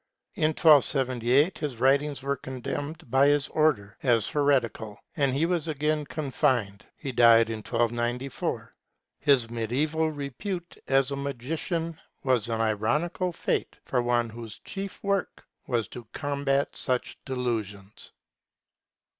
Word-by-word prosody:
In 160 -6 +2
1278 135 -1 +4
his 145 -6 -3
writings 140 +2 +2
were 140 0 0
condemned 140 +3 -6
by 135 +2 +5
his 145 -1 +2
Order 145 -11 +1
as 120 -5 +2
heretical, 125 -7 +1 0.2
and 140 -4 +2
he 155 +4 +2
was 170 -2 0
again 150 0 0
confined. 130 -9 -1
He 135 - -5
died 115 -2 +6
in 110 - -3
1294. 120 +4 -2 0.5
His 135 -6 +3
mediaeval 145 +8 0
repute 160 - -5
as 135 0 +3
a - - -1
magician 155 +5 -3 0.2
was 125 -4 +1
an 115 -1 0
ironical 120 - 0
fate - - -2
for 125 - +1
one 120 -1 +1
whose 115 -1 -8
chief 195 0 -6
work 200 -1 -1 0.2
was 115 -5 0
to 120 -3 -9
combat 140 -1 0
such 125 -2 -2
delusions. 110 -6 -4
135 Hz, 125 wpm, -27 LUFS, 120-150 Hz, 0.5 s, died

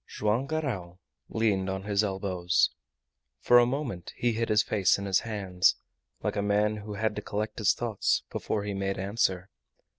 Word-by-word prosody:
Joam 110 +6 0
Garral 115 - -3 0.3
leaned 100 -4 +1
on 95 0 -3
his 100 0 +1
elbows. 95 -3 +1 0.7
For 120 - +6
a 120 - +4
moment 120 - -4
he 120 - +1
hid 115 +1 -1
his 105 0 +4
face 100 -4 +2
in 100 - -5
his 95 -2 +3
hands, 95 -5 +1 0.5
like - - -1
a 100 - 0
man 105 +1 +1
who 105 0 -7
had 110 +1 -1
to - - -2
collect 105 +1 -4
his 105 - +3
thoughts 115 -4 0
before 105 - -2
he 105 0 -3
made 95 0 -2
answer. 95 -1 -1
105 Hz, 175 wpm, -28 LUFS, 95-110 Hz, 0.7 s, For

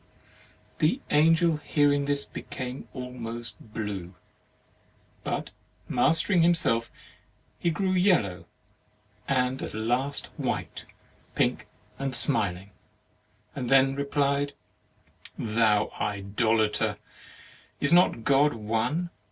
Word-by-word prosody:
The 165 - +2
Angel 165 +2 +4
hearing 145 -1 +2
this 140 0 -1
became 130 0 -7
almost 120 -2 -6
blue, 105 -5 -6 1.1
but - - -3 0.4
mastering 170 +2 +3
himself 140 -10 +2 0.7
he 170 - +1
grew 190 +3 0
yellow, 140 - +2 0.8
and 130 -1 +1
at - - -5
last 125 +6 -1
white - - -3 0.5
pink - - 0 0.3
and 135 -2 -2
smiling, 95 -3 +1 0.8
and 125 -3 -3
then 135 0 +5
replied: 140 0 0 0.8
"Thou 110 -1 +2
idolater, 105 +1 0 0.8
is 145 +3 +1
not 175 -9 +4
God 145 +1 +3
One? 115 +11 -1
130 Hz, 90 wpm, -27 LUFS, 110-145 Hz, 1.1 s, then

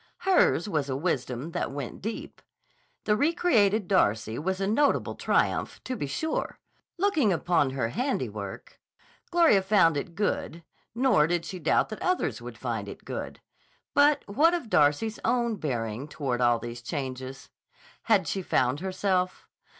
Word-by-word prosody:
Hers 365 - +3
was 150 -8 -1
a 130 - -1
wisdom 135 -2 -2
that - - -2
went 140 -2 -6
deep. 220 +3 -6 0.6
The 210 - +3
re 295 +9 +2
created 215 - +2
Darcy 110 - +1
was 190 +4 -2
a 195 - 0
notable 250 +8 +2
triumph, - - 0
to 255 - -4
be 145 - -3
sure; 315 - -3 0.4
looking 330 - +2
upon 170 -4 +2
her 130 -4 -2
handiwork, 255 - -4 0.5
Gloria 335 - +5
found 190 -5 +4
it 165 +4 -5
good, 170 -4 -2 0.3
nor 230 - +4
did 170 0 -1
she 185 - -6
doubt 155 - +2
that 215 - -7
others 365 0 0
would - - -9
find - - -3
it - - -11
good. - - -6 0.5
But 290 +1 +4
what 305 +12 +3
of 270 -11 -6
Darcy's 150 +10 +2
own 235 -2 +1
bearing 120 - -3
toward 135 -5 -3
all 120 -1 +4
these 120 +1 -7
changes? 130 0 -6 0.6
Had - - +3
she 195 - -2
found 130 -5 +1
herself? 185 0 -1
185 Hz, 150 wpm, -27 LUFS, 140-225 Hz, 0.6 s, Gloria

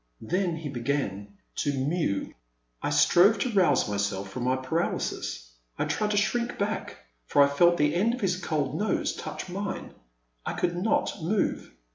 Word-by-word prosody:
Then 180 -1 0
he 160 -2 -6
began 115 -7 -3 0.2
to 145 - +1
mew. 140 - -1 0.5
I - - -1
strove 200 +5 +5
to 240 +5 -1
rouse 180 - +3
myself 100 -1 -2
from 125 +2 -4
my 130 +1 +2
paralysis 130 - -2
— - - -43
I - - 0
tried 210 -1 0
to 210 - 0
shrink 235 +4 0
back, 205 +2 -2 0.3
for 145 - +5
I - - +5
felt 170 +5 +4
the 150 -1 +2
end 215 +8 +2
of 250 - -9
his 185 -2 +1
cold 155 -6 -1
nose 215 - 0
touch - - -6
mine. 195 +2 -5 0.5
I - - -3
could 175 -1 -1
not 195 0 0
move. 195 +6 -1
165 Hz, 170 wpm, -27 LUFS, 130-195 Hz, 0.5 s, strove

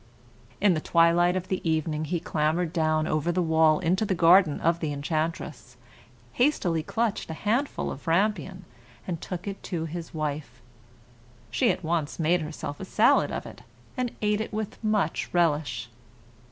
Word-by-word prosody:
In 205 -3 +4
the 155 - -1
twilight 170 +2 +3
of 185 -1 -2
evening, 160 -3 -1
he 170 +3 -1
clambered 160 +2 0
down 155 -2 +1
over 155 +2 0
the 180 - -1
wall 160 -1 +4
into 185 +4 +1
the 195 -3 0
garden 170 -2 +5
of 170 +1 +2
the 155 -3 -2
enchantress, 145 -3 -3 0.6
hastily 185 - +1
clutched 220 +5 -2
a 160 - -4
handful 235 - -1
of 140 - -9
rampion, 185 0 0 0.4
and 170 -3 -4
took 180 +1 -6
it 200 -1 -5
to 165 -4 -3
his 165 +1 -6
wife. 150 -5 -4 0.9
She 115 - +2
at 185 - -1
once 160 -2 -1
made 170 +2 +2
herself 150 -2 -6
a 190 - -5
salad - - +3
of - - -4
it, - - -11 0.3
and 250 -2 -1
ate 210 0 +2
it 220 - -5
with 215 0 -5
much 210 -7 0
relish. 145 -9 +1
165 Hz, 160 wpm, -26 LUFS, 155-185 Hz, 0.9 s, garden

